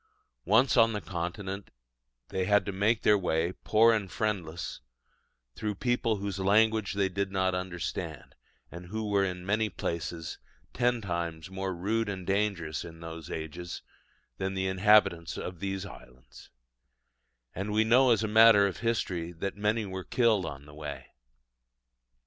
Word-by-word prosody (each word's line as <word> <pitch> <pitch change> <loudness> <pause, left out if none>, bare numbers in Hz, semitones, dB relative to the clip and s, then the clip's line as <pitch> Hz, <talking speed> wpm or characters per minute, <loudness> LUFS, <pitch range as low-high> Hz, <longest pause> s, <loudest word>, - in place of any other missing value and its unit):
Once 125 +5 +4
on 115 -1 +5
the 105 - -2
Continent, 95 +2 -5 0.6
they 95 -1 -1
had 105 +2 +3
to 100 - -2
make 105 +4 +1
their 105 -1 +5
way, 85 -1 0
poor 115 +2 +5
and 105 -4 -1
friendless, 90 -6 -3 0.7
through 105 - -3
people 120 0 0
whose 100 -1 -4
language 110 +1 +3
they 100 -1 +2
did 100 +1 -2
not 95 -1 +1
understand, 90 -1 -4 0.4
and 90 +1 -9
who 110 +3 -4
were 100 -1 +2
in 90 -2 -3
many 110 +2 +1
places 85 -1 -4 0.3
ten 120 -1 +1
times 85 -3 -4
more 95 0 -3
rude 105 +5 -1
and 95 -2 -5
dangerous 95 -6 -1
in 80 -1 -10
those 80 -1 -8
ages 85 +3 -6 0.6
than 95 0 -2
the 95 0 -1
inhabitants 95 -3 +3
of 90 -2 -6
these 95 0 -3
islands: 65 -9 -14 1.0
and 100 +3 -4
we 110 +1 +3
know 125 +4 +5
as 115 -2 +3
a - - 0
matter 110 -1 +7
of 100 - -2
history, 90 -8 -1
that 95 +3 -4
many 105 +2 0
were 95 -1 -5
killed 105 -1 +2
on 70 -2 -8
the 75 - -14
way. 75 -1 -7
95 Hz, 155 wpm, -29 LUFS, 85-105 Hz, 1.0 s, matter